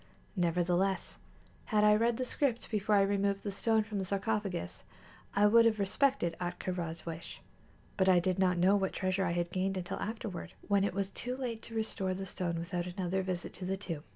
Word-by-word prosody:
Nevertheless, 180 +2 +1 0.5
had 210 -2 +2
I 210 0 +7
read 230 +2 +2
the 255 - -1
script 250 -3 -1
before 210 -1 +2
I 200 - +6
removed 200 0 +1
the 205 - -2
stone 220 +2 +2
from 210 -1 -4
the 190 - -2
sarcophagus, 200 - -2 0.5
I 205 - +5
would 230 +2 +7
have 225 -1 +3
respected 200 -2 +1
Ahtka 175 +1 -3
Rā's 170 -2 -4
wish; 165 0 -7 0.6
but 190 -1 +4
I 180 -1 +6
did 185 +1 0
not 180 -2 +3
know 185 +3 +5
what 195 -2 0
treasure 190 0 0
I 170 - 0
had 175 0 -1
gained 190 +1 0
until 180 +1 -4
afterward, 215 -4 -5
when 200 -1 +3
it 200 - -1
was 200 0 -1
too 250 +4 -4
late 240 -4 -3
to 225 - -9
restore 195 -4 -1
the 195 +1 -4
stone 175 -2 -2
without 175 +1 -3
another 185 +1 -1
visit 185 -1 -4
to 185 - -7
the 190 +1 -1
tomb. 165 -6 -5
195 Hz, 205 wpm, -32 LUFS, 180-210 Hz, 0.6 s, I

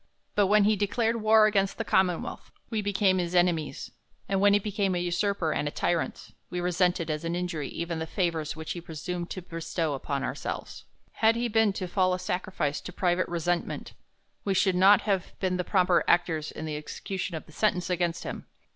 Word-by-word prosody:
But 205 -2 +3
when 210 +1 +5
he 215 +1 +4
declared 225 +3 0
war 215 0 +6
against 195 -2 +1
the - - -1
commonwealth, 180 -3 0 0.2
we 220 -2 0
became 195 -2 +2
his 175 0 -2
enemies; 170 -5 +1 0.4
and 195 -1 0
when 205 0 +6
he - - +6
became 200 -2 -1
an 175 - 0
usurper 175 -1 0
and 150 - -1
a - - +1
tyrant, 170 +2 -2 0.2
we 180 - -3
resented, 175 -2 +1
as 155 +1 -3
an 165 +1 -2
injury, 175 -5 -3
even 170 0 -4
the 160 - -3
fa 175 0 +1
vours 155 -2 -4
which 160 0 -6
he 175 - -4
presumed 175 +2 -5
to 185 - -6
bestow 165 -2 -2
upon 140 0 -3
ourselves. - - -5 0.3
Had 225 +1 +3
he 240 +1 0
been 225 -2 +3
to 185 -1 -4
fall 185 0 +2
a - - -3
sacrifice 180 -5 -2
to - - -8
private 180 0 +1
resentment, 175 0 -2 0.5
we 195 -1 0
should 190 0 +3
not 195 +3 +6
have 195 -4 -2
been 185 -1 0
the 180 - -1
proper 180 -2 +3
actors 165 -3 +2
in 160 - -6
the 155 -1 -3
exe 150 0 -7
cution 190 -2 -3
of - - -9
the - - -16
sentence 180 -1 +1
against 175 -1 0
him. - - -6
180 Hz, 205 wpm, -28 LUFS, 170-195 Hz, 0.5 s, war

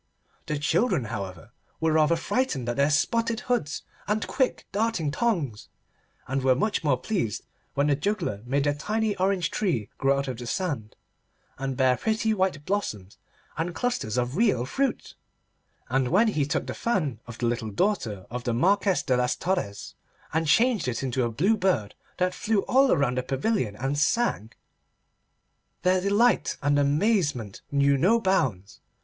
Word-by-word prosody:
The 150 - -1
children, 170 - +1
however, 95 -6 -6 0.3
were 160 0 +1
rather 155 +1 +4
frightened 165 - -1
at 120 - -1
their 140 +3 +3
spotted 230 +9 +1
hoods 195 -12 -1 0.2
and 210 +2 0
quick 260 -2 -1
darting 205 -8 0
tongues, 155 - -1 0.6
and 135 +1 -1
were 130 -1 +4
much 210 +7 0
more 140 -4 +2
pleased 125 - -2 0.3
when 140 +1 +2
the 145 -1 +3
juggler 145 - -2
made 140 +2 +1
a 145 - +2
tiny 210 +7 -1
orange 185 -2 +1
tree 160 - -1
grow 135 0 +3
out 140 0 -2
of 125 -3 -4
the 120 - -6
sand 135 - -3 0.6
and 135 -1 -3
bear 130 -1 +3
pretty 220 0 0
white 185 -8 -1
blossoms 105 - -3 0.4
and 170 +1 -2
clusters 240 - -1
of 125 +2 -1
real 200 - +2
fruit; 270 - -2 0.7
and 130 +1 +1
when 210 - +4
he 150 -9 0
took 140 - -1
the 130 - -4
fan 155 - -1
of 120 -1 -8
the 120 - -2
little 115 -2 -1
daughter 110 - -1
of 125 0 -4
the 120 -2 -1
Marquess 195 - +2
de 130 - +1
Las 125 0 +1
Torres, 175 - -3 0.4
and 160 0 +1
changed 225 - +3
it 125 +2 -2
into 130 -1 0
a 120 - 0
blue 180 - +2
bird 180 - 0 0.2
that 180 0 +1
flew 215 -2 0
all 265 +1 +4
round 130 -2 +1
the - - 0
pavilion 135 - -1
and 135 +6 -2
sang, 155 - +1 1.3
their 185 0 +3
delight 205 +5 +2
and 145 0 +3
amazement 145 - +1
knew 140 -1 +3
no 220 - +4
bounds. 140 - 0
150 Hz, 165 wpm, -26 LUFS, 125-205 Hz, 1.3 s, rather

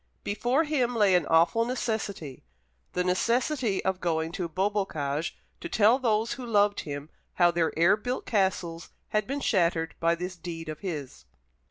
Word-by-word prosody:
Before 240 +9 +1
him 260 -6 0
lay 205 -4 +4
an 175 -4 +3
awful 165 +8 +4
necessity 220 - -3 0.5
the 180 - +1
necessity 235 +4 0
of 190 -1 0
going 160 -1 0
to 175 -1 -3
Beaubocage 170 -5 -1 0.2
to - - -6
tell 220 +4 +4
those 225 -2 +1
who 260 - -7
loved 205 -3 +2
him 145 0 -6 0.2
how 175 -1 +5
their 170 -1 +1
air 170 +5 +5
built 245 +4 -4
castles 190 -5 -1 0.2
had 215 -1 0
been 280 +1 -3
shattered 170 -7 +1
by 170 0 +2
this 180 +2 -5
deed 165 -2 -7
of 155 - -6
his. 145 - -6
190 Hz, 160 wpm, -28 LUFS, 165-225 Hz, 0.5 s, how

